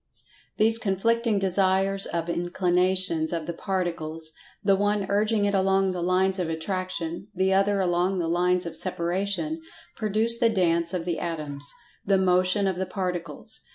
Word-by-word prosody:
These 225 Hz, +1 st, +5 dB
conflicting 225 Hz, +2 st, 0 dB
Desires 195 Hz, 0 st, +3 dB
of 170 Hz, 0 st, -3 dB
Inclinations 175 Hz, -1 st, +1 dB
of 165 Hz, -2 st, -3 dB
the 170 Hz, -, -4 dB
Particles—the 170 Hz, +1 st, -3 dB
one 205 Hz, 0 st, 0 dB
urging 210 Hz, +1 st, +1 dB
it 200 Hz, -, 0 dB
along 195 Hz, 0 st, +2 dB
the 180 Hz, -1 st, -4 dB
lines 185 Hz, +2 st, +1 dB
of 175 Hz, -3 st, -2 dB
Attraction—the 185 Hz, +2 st, -3 dB
other 195 Hz, +1 st, +2 dB
along 180 Hz, +1 st, 0 dB
the 170 Hz, -2 st, -1 dB
lines 180 Hz, +2 st, +1 dB
of 170 Hz, -, -6 dB
Separation—produce 215 Hz, -, -2 dB
the 235 Hz, -2 st, +4 dB
Dance 170 Hz, -4 st, +1 dB
of 170 Hz, -2 st, -3 dB
the 175 Hz, -2 st, -2 dB
Atoms—the 155 Hz, +4 st, -2 dB
Motion 185 Hz, +2 st, +2 dB
of 190 Hz, -2 st, -1 dB
the 190 Hz, 0 st, -2 dB
Particles. 180 Hz, -5 st, -4 dB
185 Hz, 135 wpm, -25 LUFS, 175-200 Hz, -, These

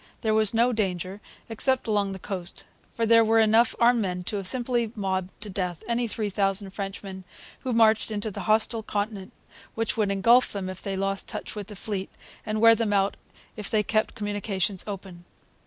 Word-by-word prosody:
There 220 Hz, -2 st, +1 dB
was 215 Hz, -2 st, +3 dB
no 235 Hz, +2 st, +3 dB
danger 190 Hz, -2 st, -2 dB, 0.3 s
except 255 Hz, +3 st, +1 dB
along 205 Hz, -2 st, +1 dB
the 190 Hz, -, -5 dB
coast; 185 Hz, -1 st, -5 dB, 0.3 s
for 230 Hz, -, -1 dB
there 230 Hz, 0 st, +6 dB
were 225 Hz, +1 st, +3 dB
enough 225 Hz, +1 st, +4 dB
armed 240 Hz, 0 st, +4 dB
men 180 Hz, -2 st, -2 dB
to 205 Hz, -, -3 dB
have 195 Hz, -2 st, 0 dB
simply 240 Hz, -1 st, +1 dB
mobbed 190 Hz, -3 st, -2 dB
to 210 Hz, -, -4 dB
death 180 Hz, -3 st, -3 dB
any 235 Hz, 0 st, 0 dB
three 215 Hz, -2 st, -3 dB
thousand 195 Hz, 0 st, 0 dB
Frenchmen 195 Hz, -1 st, -6 dB, 0.4 s
who 255 Hz, -, -3 dB
marched 225 Hz, -2 st, +4 dB
into 215 Hz, 0 st, -3 dB
the -, -, -7 dB
hostile 220 Hz, +1 st, +3 dB
continent, 205 Hz, -2 st, -3 dB, 0.4 s
which 225 Hz, 0 st, -1 dB
would 210 Hz, -3 st, +1 dB
engulf 230 Hz, +6 st, +4 dB
them 195 Hz, -2 st, -4 dB
if 185 Hz, 0 st, -8 dB
they 195 Hz, -1 st, -3 dB
lost 195 Hz, 0 st, -1 dB
touch -, -, -5 dB
with 205 Hz, -2 st, -6 dB
the 210 Hz, -, -9 dB
fleet, 195 Hz, -1 st, -4 dB, 0.4 s
and 215 Hz, 0 st, -1 dB
wear 230 Hz, 0 st, +8 dB
them 220 Hz, -2 st, 0 dB
out 195 Hz, 0 st, +2 dB, 0.4 s
if 210 Hz, -2 st, -6 dB
they 215 Hz, -1 st, +2 dB
kept 215 Hz, +2 st, 0 dB
communications 205 Hz, -3 st, -1 dB
open. 190 Hz, -3 st, -7 dB
210 Hz, 190 wpm, -26 LUFS, 195-225 Hz, 0.4 s, wear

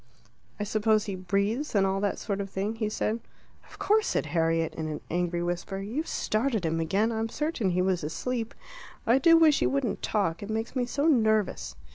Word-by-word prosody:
"I -, -, -1 dB
suppose 215 Hz, +1 st, +2 dB
he 200 Hz, -, -3 dB
breathes, 200 Hz, +9 st, -1 dB
and 195 Hz, -1 st, +4 dB
all 195 Hz, 0 st, 0 dB
that 200 Hz, 0 st, 0 dB
sort 200 Hz, -1 st, -3 dB
of 195 Hz, -, -5 dB
thing?" 200 Hz, +4 st, -3 dB
he 215 Hz, -2 st, -1 dB
said. 215 Hz, +1 st, -1 dB, 0.5 s
"Of -, -, -14 dB
course," 430 Hz, +2 st, +2 dB
said -, -, 0 dB
Harriet, 165 Hz, -1 st, +1 dB
in 160 Hz, -1 st, -4 dB
an 155 Hz, -1 st, -4 dB
angry 175 Hz, 0 st, 0 dB
whisper. 175 Hz, +2 st, -3 dB
"You've 235 Hz, +12 st, -3 dB
started 220 Hz, -3 st, 0 dB
him 165 Hz, 0 st, 0 dB
again. 195 Hz, +8 st, +1 dB
I'm 225 Hz, 0 st, -2 dB
certain 300 Hz, -, -1 dB
he 180 Hz, 0 st, +1 dB
was 185 Hz, -3 st, 0 dB
asleep. 230 Hz, +9 st, -3 dB, 0.5 s
I 240 Hz, +4 st, +4 dB
do 330 Hz, +2 st, +6 dB
wish 315 Hz, -3 st, +5 dB
you -, -, +3 dB
wouldn't 270 Hz, -5 st, -1 dB
talk; 180 Hz, -6 st, 0 dB
it 205 Hz, -, -7 dB
makes 225 Hz, +4 st, -3 dB
me 250 Hz, -2 st, 0 dB
so 280 Hz, +4 st, -1 dB
nervous." 220 Hz, -, +2 dB
210 Hz, 200 wpm, -28 LUFS, 185-235 Hz, 0.5 s, do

